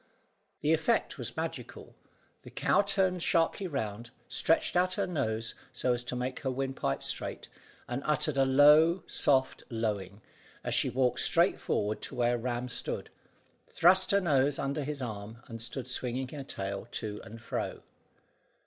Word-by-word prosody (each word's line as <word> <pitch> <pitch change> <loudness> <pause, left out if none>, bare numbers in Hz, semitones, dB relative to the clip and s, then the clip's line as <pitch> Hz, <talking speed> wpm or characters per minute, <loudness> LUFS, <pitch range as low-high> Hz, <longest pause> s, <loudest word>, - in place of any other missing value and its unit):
The 150 +2 +3
effect 160 +9 +1
was - - -6
magical, - - -5 0.5
the - - -12
cow - - +2
turned 190 -3 +1
sharply 170 +4 +1
round, 115 - -4 0.2
stretched - - +1
out 180 +1 +3
her 200 - 0
nose 115 -10 -2 0.2
so 125 - 0
as 120 0 -2
to 125 - -3
make 125 +1 -3
her 135 - -2
windpipe 130 - -2
straight, - - -3 0.4
and 125 +2 -3
uttered 150 -1 +1
a 135 - +4
low 150 +6 +6
soft 130 -2 +2
lowing, 105 -3 -3 0.4
as - - -1
she - - +3
walked 125 -1 +1
straight - - +4
forward 105 +1 -1
to - - -5
where 120 0 +2
Ram 120 +1 -2
stood, 125 - -3 0.6
thrust 185 +2 +4
her 200 - +4
nose 140 -4 +2
under 140 +2 -2
his 140 -1 -4
arm, 110 +1 -7
and 115 -4 -8
stood 125 +2 -4
swinging 130 0 -2
her 145 -1 -6
tail 100 -4 -5
to 105 -2 -4
and 115 0 -10
fro. 110 - -4
130 Hz, 160 wpm, -30 LUFS, 115-155 Hz, 0.6 s, low